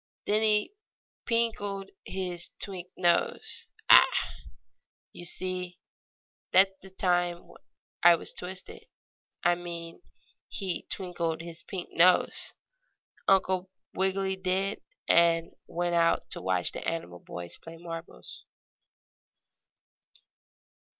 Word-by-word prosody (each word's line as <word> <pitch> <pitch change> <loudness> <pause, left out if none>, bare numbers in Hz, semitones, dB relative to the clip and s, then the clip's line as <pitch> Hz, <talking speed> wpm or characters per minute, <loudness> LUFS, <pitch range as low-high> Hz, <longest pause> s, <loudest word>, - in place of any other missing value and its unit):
Then 210 +1 +2
he 215 - +3 0.5
pinkled 205 -4 0
his 180 -2 -4
twink 185 -3 -4
nose 175 -1 +1 0.2
Ah! - - +9 1.0
you 175 - -7
see 180 0 -1 0.7
that's 190 +1 +6
the 195 - -12
time 175 -2 0 0.5
I 175 0 +8
was - - -4
twisted 185 +1 -7 0.6
I 175 - +5
mean 170 - -7 0.5
he 190 -4 -2
twinkled 170 -4 -2
his 170 0 -8
pink 185 -3 -6
nose, 180 +2 +4 0.7
Uncle 190 -1 +3 0.2
Wiggily 190 0 0
did, 190 +2 0 0.3
and 165 -1 +5
out - - -29
he - - -17
went 170 -1 +1
to - - -4
watch 90 -1 +1
the - - -6
animal 90 - -3
boys 85 0 -7
play 165 0 -11
marbles. 165 - -9
180 Hz, 105 wpm, -29 LUFS, 170-190 Hz, 1.0 s, Ah